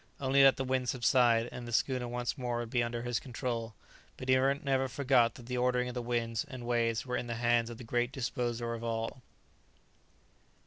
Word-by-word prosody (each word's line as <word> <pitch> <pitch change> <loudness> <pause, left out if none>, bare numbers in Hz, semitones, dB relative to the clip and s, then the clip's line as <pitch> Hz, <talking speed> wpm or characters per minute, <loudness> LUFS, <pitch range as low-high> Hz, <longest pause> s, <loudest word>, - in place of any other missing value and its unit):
Only 135 0 +4
let 135 -1 +6
the 135 - -1
wind 130 -1 0
subside, 120 -2 +3
and 120 -1 -7
the - - -6
schooner 125 +1 0
once 120 0 -2
more 125 -3 -2
would 120 -1 -4
be 120 - +2
under 120 0 -2
his 120 -1 -1
control; 120 -4 -4 0.4
but 130 - -7
he 130 - +6
never 135 0 +1
forgot 125 -3 +2
that 120 - -11
the 125 0 -2
ordering 125 0 +1
of - - -6
the 125 - -3
winds 115 -1 -1
and 130 -5 -9
waves 115 -1 0
were 125 -1 -2
in 120 - -4
the 115 - -3
hands 120 0 +2
of 120 - -8
the 125 - -9
Great 120 +2 0
Disposer 120 -2 -2
of 115 0 -6
all. 115 +2 -3
120 Hz, 210 wpm, -31 LUFS, 120-130 Hz, 0.4 s, let